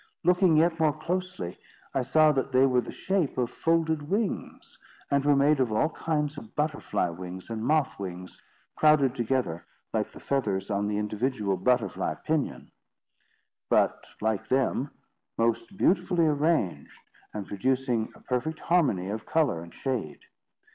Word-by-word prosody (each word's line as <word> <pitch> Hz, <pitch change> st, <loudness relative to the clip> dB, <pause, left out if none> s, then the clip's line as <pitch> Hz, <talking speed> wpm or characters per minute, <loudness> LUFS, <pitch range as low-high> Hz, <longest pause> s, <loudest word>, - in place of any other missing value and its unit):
Looking 180 Hz, -2 st, +4 dB
yet 165 Hz, +1 st, +3 dB
more 155 Hz, -2 st, +3 dB
closely, 175 Hz, -, -4 dB, 0.3 s
I 135 Hz, -, +1 dB
saw 155 Hz, +5 st, +4 dB
that 135 Hz, -1 st, -1 dB
they 130 Hz, +1 st, +5 dB
were 125 Hz, -2 st, +3 dB
of -, -, -3 dB
the -, -, -6 dB
shape 190 Hz, -9 st, -1 dB
of 125 Hz, -2 st, 0 dB
folded 160 Hz, -2 st, 0 dB
wings, 205 Hz, 0 st, -3 dB, 0.3 s
and 140 Hz, -1 st, +3 dB
were 145 Hz, 0 st, +4 dB
made 145 Hz, +1 st, +4 dB
of 125 Hz, -4 st, +1 dB
all 110 Hz, +9 st, +2 dB
kinds 150 Hz, -2 st, -2 dB
of 110 Hz, -, -15 dB
butterfly 150 Hz, -, -1 dB
wings 90 Hz, +4 st, -8 dB
and 110 Hz, -1 st, -3 dB
moth 150 Hz, -1 st, +1 dB
wings, 90 Hz, -1 st, -7 dB, 0.3 s
crowded 150 Hz, -4 st, +4 dB
together 120 Hz, -9 st, -1 dB, 0.3 s
like -, -, 0 dB
the -, -, -13 dB
feathers 105 Hz, -8 st, -1 dB
on 100 Hz, 0 st, 0 dB
the 105 Hz, 0 st, -1 dB
individual 105 Hz, -1 st, -1 dB
butterfly 110 Hz, 0 st, 0 dB
pinion; 155 Hz, -3 st, -2 dB, 1.0 s
but, -, -, +2 dB
like 110 Hz, -2 st, -1 dB
them, 135 Hz, +1 st, +1 dB, 0.5 s
most 115 Hz, -, 0 dB
beautifully 180 Hz, -3 st, +3 dB
arranged, 150 Hz, -, 0 dB, 0.3 s
and 105 Hz, -2 st, -5 dB
producing 125 Hz, +2 st, 0 dB
a -, -, -17 dB
perfect 135 Hz, +6 st, -2 dB
harmony 145 Hz, -, +2 dB
of 105 Hz, +2 st, -5 dB
colour 145 Hz, -, +1 dB
and 85 Hz, 0 st, -11 dB
shade. 115 Hz, -, -3 dB
135 Hz, 150 wpm, -27 LUFS, 105-155 Hz, 1.0 s, they